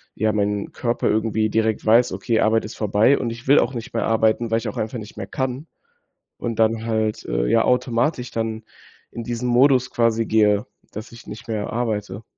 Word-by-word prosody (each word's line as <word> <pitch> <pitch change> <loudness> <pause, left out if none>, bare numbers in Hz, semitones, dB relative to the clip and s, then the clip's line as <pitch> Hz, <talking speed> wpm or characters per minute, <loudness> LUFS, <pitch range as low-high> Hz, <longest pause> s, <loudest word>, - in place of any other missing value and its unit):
ja, 110 0 +1
mein 105 -1 -1
Körper 120 -1 -1
irgendwie 110 0 +1
direkt 110 0 0
weiß: 115 +2 +4
„Okay, 105 +4 0
Arbeit 110 0 +2
ist 110 - -8
vorbei 105 +5 +3
und 120 - -2
ich 115 +2 -9
will 140 +2 +6
auch 135 - 0
nicht 115 -2 -7
mehr - - 0
arbeiten, 110 +1 +1
weil 115 - +3
ich 115 0 -4
auch 105 - -5
einfach 110 +3 -3
nicht 110 -1 -9
mehr - - -6
kann“, 130 +1 -3 0.7
und 115 -2 -4
dann 110 0 +2
halt, 110 -1 -1
äh, - - -1
ja, 115 - +3
automatisch 125 +1 0
dann 110 -1 -3 0.5
in 115 - -7
diesen 120 +1 -3
Modus 130 +1 +4
quasi 115 -1 +1
gehe, 105 -2 +3 0.3
dass 110 +3 -8
ich 115 - -14
nicht 110 +3 -10
mehr 105 -2 -2
arbeite. 105 -3 -3
115 Hz, 200 wpm, -22 LUFS, 110-120 Hz, 0.7 s, will